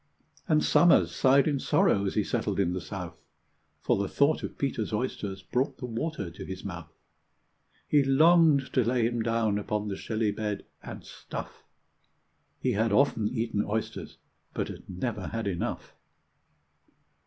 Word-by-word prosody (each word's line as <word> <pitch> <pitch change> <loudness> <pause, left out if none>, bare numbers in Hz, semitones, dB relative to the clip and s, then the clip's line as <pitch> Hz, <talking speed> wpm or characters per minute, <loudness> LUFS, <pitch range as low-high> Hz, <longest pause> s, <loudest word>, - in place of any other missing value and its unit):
And 155 -3 +3
Somers 95 - +5
sighed 135 +2 +4
in 145 -3 +1
sorrow 165 - +2
as - - -3
he - - +2
settled - - -2
in 90 -3 +1
the 90 - -3
south, 90 -2 -7 0.6
For - - +1
the 100 - 0
thought 145 +2 +2
of - - -6
Peter's 130 -6 -2
oysters 105 -4 -3
brought 125 +8 -1
the 125 - -6
water 115 - -4
to 85 - -9
his 95 +1 -7
mouth. 85 -4 -7 1.0
He 150 - +4
longed 155 0 +4
to 130 - +3
lay 120 0 +1
him 120 0 0
down 110 -2 +1
upon 105 0 -2
the 100 - -3
shelly 110 +1 -1
bed, 105 -2 -4 0.2
and - - -9
stuff: - - -8 0.9
He 130 - 0
had 110 0 +1
often 110 -2 +3
eaten 115 -3 -1
oysters, 110 +2 -4 0.4
but - - -2
had - - -10
never 100 +1 -3
had 115 -1 -4
enough. 90 -4 -3
110 Hz, 155 wpm, -28 LUFS, 100-135 Hz, 1.0 s, Somers